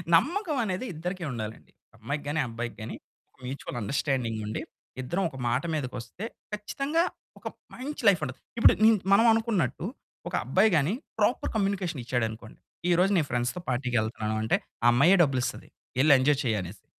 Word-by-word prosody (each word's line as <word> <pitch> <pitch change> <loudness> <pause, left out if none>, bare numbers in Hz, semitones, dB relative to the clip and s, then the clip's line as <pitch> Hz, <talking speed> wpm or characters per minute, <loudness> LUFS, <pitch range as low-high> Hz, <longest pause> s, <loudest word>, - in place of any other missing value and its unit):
నమ్మకమనేది 265 - +1
ఇద్దరికీ 175 +3 -4
ఉండాలండి. 110 -2 -6 0.3
అమ్మాయికి 140 +7 -4
గాని, 150 +2 0
అబ్బాయికి 115 +1 -5
గాని 110 - -5 0.5
మ్యూచువల్ 130 -1 -5
అండర్‌స్టాండింగ్ 120 0 -1
ఉండి, 105 - -3 0.4
ఇద్దరం 175 +10 -1
ఒక 135 - -11
మాట 120 +3 +1
మీదకొస్తే 130 - -4 0.3
ఖచ్చితంగా 275 +10 0 0.4
ఒక - - -7 0.3
మంచి 285 +4 -5
లైఫ్ 195 -5 +5
ఉంటది. 130 -2 -7 0.2
ఇప్పుడు 230 - +7
నిన్ 220 0 +7 0.2
మనం 225 +4 +6
అనుకున్నట్టు 220 - 0 0.4
ఒక - - -14
అబ్బాయి 190 - +4
గాని 150 +6 +2 0.3
ప్రాపర్ 215 +4 +1
కమ్యూనికేషన్ 195 - -1
ఇచ్చాడనుకోండి. 115 -2 -3 0.3
ఈరోజు 180 +3 +4
నేను 155 -4 +1
ఫ్రెండ్స్‌తో 120 +8 -1
పార్టీకి 125 0 -1
వెళ్తున్నాను 110 0 -2
అంటే, 110 - +2 0.3
ఆ - - +6
అమ్మాయే 160 +10 +6
డబ్బులు 135 -4 +1
ఇస్తాది. - - -4 0.3
వెళ్లి 145 +2 +7
ఎంజాయ్ 140 +1 +3
చెయ్యి 115 -4 +1
అనేసి. 95 +3 -9
145 Hz, 150 wpm, -28 LUFS, 120-195 Hz, 0.5 s, ఇప్పుడు